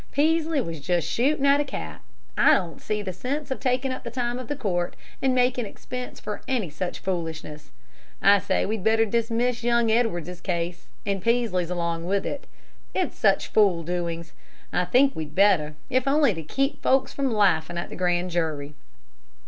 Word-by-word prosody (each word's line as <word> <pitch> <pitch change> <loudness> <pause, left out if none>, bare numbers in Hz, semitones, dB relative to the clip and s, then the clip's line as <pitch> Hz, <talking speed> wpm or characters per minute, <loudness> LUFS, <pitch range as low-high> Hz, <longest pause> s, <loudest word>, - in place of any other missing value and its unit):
Peaslee 315 0 +2
was 165 -8 -5
just 170 +2 0
shooting 275 +3 +1
at 280 +1 +5
a - - +1
cat. 80 - -6 0.3
I - - +6
don't 170 -2 -3
see 210 -1 -2
the 185 -2 -4
sense 270 - -4
of 265 - -2
taking 255 +1 0
up 255 - -5
the 235 - -4
time 240 +1 -2
of 255 - -7
the 290 - -2
court 180 -9 -1 0.3
and 265 -1 +2
makin' 250 -2 +2
expense 250 +4 -7
for 210 - -5
any 235 - -1
such 175 +4 -4
foolishness. 160 -5 -4 0.5
I 200 0 +6
say 190 0 0
we'd 215 -1 -2
better 225 +1 +4
dismiss 235 +2 0
young 235 -1 +3
Edwards's 180 -7 0
case, 170 -1 -3 0.2
and 200 -2 -1
Peaslee's 225 -6 +1
along 170 -2 -2
with 195 +2 0
it. 285 - -4 0.5
It's 370 - 0
such 195 -3 +2
fool 195 -6 +3
doings, 170 -1 -3 0.4
I 180 - +2
think 265 +9 +4
we'd 155 -1 -6
better, 180 -7 +4
if 255 0 +1
only 280 -4 +4
to 165 - -5
keep 275 - -1
folks 265 0 +2
from 275 -2 0
laughing 175 -6 +2
at 170 - -4
the - - -7
grand 180 0 0
jury." 155 -4 -2
205 Hz, 180 wpm, -25 LUFS, 175-250 Hz, 0.5 s, I